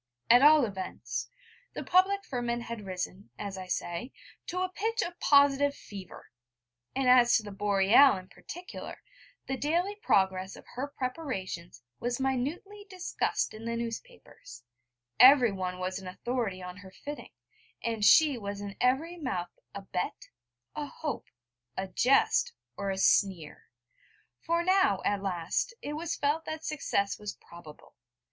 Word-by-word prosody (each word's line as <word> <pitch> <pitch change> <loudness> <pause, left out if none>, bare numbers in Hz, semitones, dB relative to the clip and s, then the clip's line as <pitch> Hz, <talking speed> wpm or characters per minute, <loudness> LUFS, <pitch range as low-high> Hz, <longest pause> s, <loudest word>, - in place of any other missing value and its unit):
At 245 +1 +8
all 300 -1 +7
events, 125 - -5 0.4
the - - -5
public 395 +2 +3
ferment 240 -1 -2
had 230 -4 -7
risen, 185 +1 -5
as 200 -2 -5
I 185 -1 -7
say, 180 +7 -3 0.4
to 365 +1 -1
a 370 - -1
pitch 445 +5 -1
of 345 0 -6
positive 280 0 +4
fever; 195 -3 -11 0.6
and 265 -1 +1
as 250 -1 +6
to 220 - -4
the 205 - -8
Boreal 200 +5 +5
in 185 0 -10
particular, 355 - -9 0.4
the 265 - -3
daily 340 +8 0
progress 190 - +1
of - - -14
her 260 +3 -3
preparations 250 - -5 0.2
was 245 +1 -2
minutely 295 +11 -2
discussed 365 -2 -2
in 220 +1 -9
the 230 0 -2
newspapers, 230 - -8 0.6
everyone 215 -9 +6
was 185 +1 -3
an 190 - -10
authority 200 -1 -3
on 180 +1 -8
her 200 -1 -12
fitting, 290 +9 -9 0.5
and 225 -2 -2
she 290 +2 +6
was 200 -1 -5
in 200 -1 -6
every 290 +8 +1
mouth 185 - -3 0.2
a 200 - -6
bet, 180 -2 -4 0.5
a 295 - -3
hope, 295 -3 -5 0.5
a 190 - -2
jest, 275 - +3 0.2
or 200 -1 -3
a 190 - -2
sneer: 190 -5 +2 0.7
for 335 +1 0
now, 370 - +3
at 200 -1 +1
last, 185 - -2
it 295 - -4
was 325 +2 -3
felt 295 +3 0
that 315 0 -5
success 200 -9 -1
was 210 -1 -6
probable. 170 -3 -14
235 Hz, 145 wpm, -29 LUFS, 190-295 Hz, 0.7 s, At